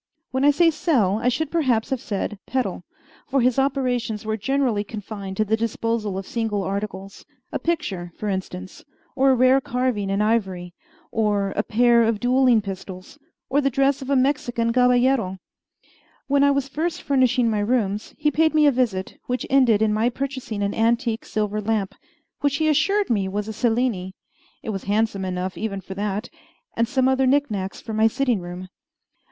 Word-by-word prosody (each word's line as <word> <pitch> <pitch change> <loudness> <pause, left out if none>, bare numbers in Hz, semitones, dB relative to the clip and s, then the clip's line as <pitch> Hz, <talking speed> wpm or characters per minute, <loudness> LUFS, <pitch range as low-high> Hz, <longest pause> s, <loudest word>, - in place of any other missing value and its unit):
When 260 +1 0
I 290 - +6
say 330 +3 +4
sell, 235 - +1
I 245 - +2
should 285 +4 -2
perhaps 260 -10 +1
have 260 -3 -1
said 205 0 -3
peddle; 260 -1 -2 0.4
for 275 0 +1
his 250 +1 +2
operations 250 -5 -1
were 220 0 -1
generally 235 -1 0
confined 205 -2 -7
to 215 - +2
the 215 +2 +2
disposal 225 -2 -2
of 195 - -5
single 220 -3 -2
articles 195 0 -5 0.3
a - - -2
picture, 205 - -2
for 215 - -4
instance, 190 -1 -5 0.3
or 270 0 +4
a 265 - +5
rare 255 +2 +4
carving 250 -6 -1
in 195 +1 0
ivory, 190 -5 0 0.4
or 205 -3 0
a - - +2
pair 235 +2 +3
of 225 -2 +1
duelling 250 -1 +3
pistols, 190 +5 -8 0.3
or 285 +2 +2
the 275 - +2
dress 275 +2 +1
of 265 - -7
a 280 - +3
Mexican 245 -3 +1
caballero. 250 -5 +3 0.9
When 280 0 +2
I 285 - +5
was 280 -1 +1
first 315 +4 -3
furnishing 255 -3 +2
my 215 -2 +1
rooms, 210 -2 -1
he 300 - +1
paid 315 +2 +2
me 305 -1 +5
a 290 - +6
visit, 230 -8 -1
which 250 0 -2
ended 240 -6 +4
in 215 -1 +2
my 220 +3 +2
purchasing 260 -5 -4
an 200 - -1
antique 230 0 0
silver 210 0 -2
lamp, 210 -2 -1 0.5
which 285 -1 +1
he 315 +2 +1
assured 390 +7 +2
me 200 -4 +1
was 205 +2 -3
a 220 - -4
Cellini 225 -5 0 0.5
it 220 - -3
was 195 -2 -5
handsome 205 -1 0
enough 185 0 -3
even 205 -3 -3
for 190 - -8
that 205 +3 -3 0.5
and 230 0 +1
some 260 +1 +1
other 265 0 +2
knick 285 -1 +2
knacks 195 -2 -4
for 225 - -7
my 220 +1 +4
sitting 245 -1 0
room. 180 +1 -7
230 Hz, 180 wpm, -23 LUFS, 205-265 Hz, 0.9 s, I